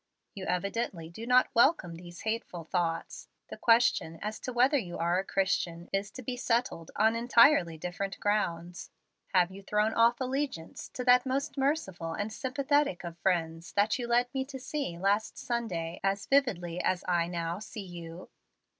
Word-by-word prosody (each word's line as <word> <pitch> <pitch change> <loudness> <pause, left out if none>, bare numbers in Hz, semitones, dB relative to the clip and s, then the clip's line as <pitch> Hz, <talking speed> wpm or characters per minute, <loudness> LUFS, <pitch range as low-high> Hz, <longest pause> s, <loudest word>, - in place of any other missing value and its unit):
You 190 -2 -6
evidently 180 -2 -2
do 225 +7 -8
not 250 +1 +4
welcome 235 - +3
these 175 +1 -10
'hateful 220 -6 -3
thoughts.' 165 0 -2 0.2
The - - -6
question 230 -8 +3
as 210 +3 -4
to 255 - -5
whether 250 +4 +3
you 175 -7 -6
are 170 +2 +1
a - - -1
Christian 180 -3 -1
is 195 +1 0
to 255 - -8
be 250 +2 -3
settled 235 -9 -1
on 220 +2 +3
entirely 235 - +5
different 180 +4 -4
grounds. 180 -4 -1 0.5
Have 180 0 +4
you 195 +1 -10
thrown 210 +2 +1
off 235 +1 +4
allegiance 265 - -3
to 250 - -3
that 250 +1 +5
most 275 +3 -1
merciful 265 - -1
and 205 +5 -3
sympathetic 280 -4 0
of 170 -1 -6
friends 165 -2 -1
that 205 +5 +2
you 240 - -3
led 240 +1 +3
me 265 -1 0
to 270 0 -7
see 265 - -4
last 200 +4 0
Sunday 185 -9 -3
as 195 +1 0
vividly 180 -11 +1
as 185 -1 0
I 175 -2 +2
now 170 0 -3
see 210 -1 -8
you?" 170 -1 -9
200 Hz, 170 wpm, -30 LUFS, 175-245 Hz, 0.5 s, entirely